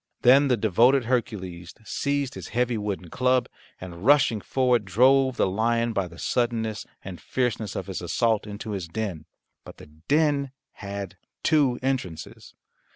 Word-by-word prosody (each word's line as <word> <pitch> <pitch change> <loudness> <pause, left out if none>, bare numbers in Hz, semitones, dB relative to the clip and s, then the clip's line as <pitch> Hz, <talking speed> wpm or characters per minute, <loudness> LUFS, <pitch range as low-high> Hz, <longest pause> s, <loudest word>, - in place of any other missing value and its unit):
Then 135 +3 +6
the 125 -3 +2
devoted 115 +5 +3
Hercules 95 -8 -3
seized 140 +1 -2
his - - -8
heavy 125 -1 +1
wooden 100 -5 -4
club, 125 0 +2 0.3
and 90 -1 -9
rushing 125 -5 +4
forward 125 +2 +1
drove 130 +6 +3
the - - +3
lion 115 +4 0
by 100 -4 -1
the 85 -1 -14
suddenness 115 -2 -1 0.2
and 95 -2 -8
fierceness 115 -5 -2
of 95 - -3
his 95 -2 -5
assault 110 +4 0
into 105 +1 -6
his 95 -5 -4
den. 90 -4 -4 0.4
But - - -12
the - - -12
den 140 - 0 0.2
had 100 -2 -7 0.3
two 140 -6 +3
entrances. 120 -12 -4
115 Hz, 150 wpm, -25 LUFS, 95-130 Hz, 0.4 s, Then